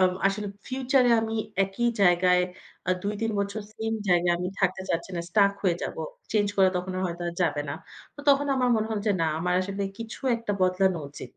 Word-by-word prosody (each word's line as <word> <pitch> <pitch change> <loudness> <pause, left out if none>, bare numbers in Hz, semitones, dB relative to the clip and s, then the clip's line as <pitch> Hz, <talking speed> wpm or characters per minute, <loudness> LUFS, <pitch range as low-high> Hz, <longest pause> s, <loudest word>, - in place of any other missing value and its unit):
আ - - +5 0.2
আসলে 200 +1 -1 0.2
ফিউচার 260 0 +2
এ - - +5
আমি 225 0 -3 0.3
একই 195 +5 -1
জায়গায় 180 0 +5 0.5
আ - - +4
২-৩ 210 +2 -1
বছর 200 +2 -3
সেম 225 0 -3 0.2
জায়গায় 175 -1 +4
আমি 180 +1 -2
থাকতে 190 -1 +1
চাচ্ছি 170 +3 -2
না, 170 - -1
স্টাক 200 +1 +4
হয়ে 180 -4 +2
যাব। - - -4 0.4
চেঞ্জ 205 -2 +2
করা 190 -1 +6
তখন 180 +1 -3
আ - - -2
হয়তো 175 0 -5
আর 170 - -5
যাবে 145 -3 +1
না। 145 - -2 0.4
তো 290 - -9
তখন 280 +1 +5
আমার 255 -1 +2
মনে 215 0 0
হল 220 - 0
যে, 210 - +4
না 165 - +2
আমার 180 +2 0
আসলে 195 +1 -3 0.2
কিছু 230 +3 -7 0.2
একটা 230 -3 -3
বদলানো 185 -1 +2
উচিত। 140 - -10
195 Hz, 210 wpm, -27 LUFS, 180-220 Hz, 0.5 s, করা